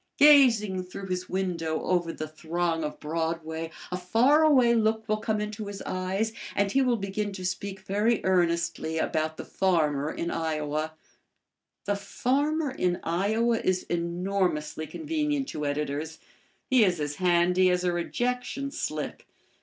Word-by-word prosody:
Gazing 230 -10 +6
through 190 +1 -8
his 180 0 -3
window 170 -4 -2
over 175 -2 +1
the 155 -1 -5
throng 165 +1 -2
of 150 - -4
Broadway, 160 +1 -3 0.2
a 180 - -1
faraway 250 - +4
look 220 -1 +1
will 215 0 +1
come 215 0 -1
into 210 0 -4
his 200 -1 -6
eyes 190 +4 -2 0.2
and 200 -1 +1
he 270 - +3
will 250 -3 +2
begin 200 +1 -3
to 185 -1 -6
speak 190 +1 -4
very 210 +4 +1
earnestly 170 -3 +1
about 155 0 -1
the - - -6
farmer 155 -6 +1
in 170 +1 -3
Iowa. 155 -1 -2 0.9
The 205 - +1
farmer 280 +9 0
in 180 -8 0
Iowa 220 +7 +1
is 185 0 0
enormously 170 -2 -1
convenient 300 -3 -2
to 150 -1 -3
editors. 150 +2 -3 0.5
He 255 -4 +5
is 180 -5 +2
as 145 0 -3
handy 180 0 +3
as 180 0 +1
a 180 -1 +1
rejection 250 +9 -2
slip. - - -4
185 Hz, 145 wpm, -27 LUFS, 165-220 Hz, 0.9 s, Gazing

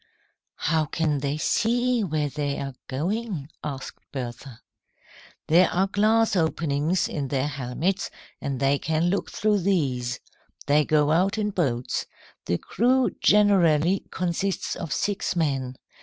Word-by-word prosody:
"How 160 0 +1
can 155 -1 0
they 140 +2 -2
see 240 +7 +1
where 155 -5 -1
they 145 0 -2
are 135 -1 -4
going?" 175 - -3
asked 135 -3 -6
Bertha. 125 -1 -7 0.8
"There 175 +3 +5
are 185 +2 +2
glass 215 +2 +2
openings 160 0 +1
in 145 -3 -3
their 130 0 0
helmets, 140 +7 -2 0.3
and 135 -2 -3
they 140 +1 +2
can 160 +2 0
look 200 - -1
through 210 -1 +1
these. 135 -10 0 0.5
They 150 +1 +3
go 150 -1 +3
out 185 +6 +2
in 210 -1 0
boats. 130 -10 -1 0.4
The 85 - +1
crew 250 - +2
generally 185 -4 +4
consists 185 +2 -2
of 165 - -6
six 200 +1 -1
men. 135 -6 -1
160 Hz, 130 wpm, -25 LUFS, 140-195 Hz, 0.8 s, There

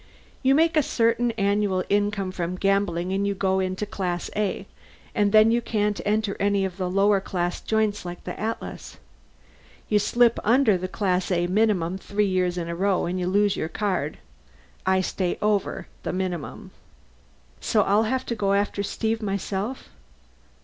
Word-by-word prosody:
You 270 0 +4
make 325 +2 +3
a 305 - +5
certain 235 -2 +1
annual 200 -3 +1
income 205 -2 0
from 180 -1 -3
gambling 190 -2 0
and 200 +1 0
you 200 - -1
go 190 0 +1
into 185 +2 -2
Class 180 -4 -3
A, 210 -2 -1 0.5
and 205 -3 +2
then 215 +1 +6
you 240 +1 +2
can't 210 -3 -1
enter 210 0 0
any 200 -1 +2
of 185 -1 -5
the 185 -2 -2
lower 195 +1 +3
class 175 -2 -2
joints 215 -2 0
like 175 0 -7
the 180 - -6
Atlas. 225 +1 -5 0.9
You 210 - +4
slip 235 +3 +3
under 230 -1 +4
the 185 +1 -3
Class 185 -1 -1
A 175 -2 +1
minimum 190 -2 +1
three 205 +2 0
years 180 -2 0
in 170 -1 -3
a 170 - -3
row 195 +1 +1
and 180 +2 -2
you 180 - -1
lose 200 +1 +2
your 160 - -3
card. 180 -5 -2 0.7
I 190 0 +3
stay 185 -1 -2
over 210 -2 0 0.2
the - - -3
minimum." 180 -4 -4 0.9
"So 210 -2 +2
I'll 205 +3 +3
have 260 0 -1
to 235 - -2
go 200 -2 +1
after 200 0 0
Steve 220 +2 -2
myself. 200 +4 -3
200 Hz, 170 wpm, -25 LUFS, 185-210 Hz, 0.9 s, then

